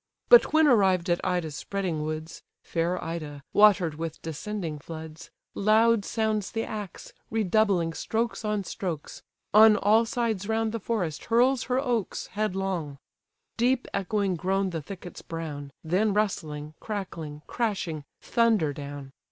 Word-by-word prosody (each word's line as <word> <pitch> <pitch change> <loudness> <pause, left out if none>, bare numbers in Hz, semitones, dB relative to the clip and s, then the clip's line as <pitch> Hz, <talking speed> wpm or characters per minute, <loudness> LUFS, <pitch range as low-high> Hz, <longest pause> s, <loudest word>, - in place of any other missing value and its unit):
But 485 -1 +8
when 315 0 +5
arrived 190 - +4
at 175 - +1
Ida's 175 -4 -1
spreading 180 -1 -3
woods, 155 +1 -5 0.2
(Fair 170 +2 -1
Ida, 155 -4 -5
water'd 205 -6 +5
with 160 +1 -5
descending 165 0 -4
floods,) 160 0 -9 0.2
Loud 220 +1 +3
sounds 220 -3 -1
the 225 0 -1
axe, 210 -4 -7 0.2
redoubling 200 -5 +2
strokes 230 +6 -2
on 210 -1 -1
strokes; 175 -5 -5 0.3
On 215 0 +8
all 220 +3 +4
sides 225 -5 -1
round 225 0 +1
the 230 - -3
forest 185 -8 -2
hurls 245 +2 +3
her 250 0 0
oaks 240 -7 -1
Headlong. 190 -8 -2 0.6
Deep 245 +2 +2
echoing 200 -1 0
groan 190 +2 0
the 165 -2 -3
thickets 180 +2 -9
brown; 150 -4 -6
Then 195 +6 +1
rustling, 155 -8 -2
crackling, 165 -8 -5
crashing, 190 -10 -2 0.2
thunder 220 -11 +2
down. 140 -1 -8
195 Hz, 135 wpm, -27 LUFS, 160-220 Hz, 0.6 s, But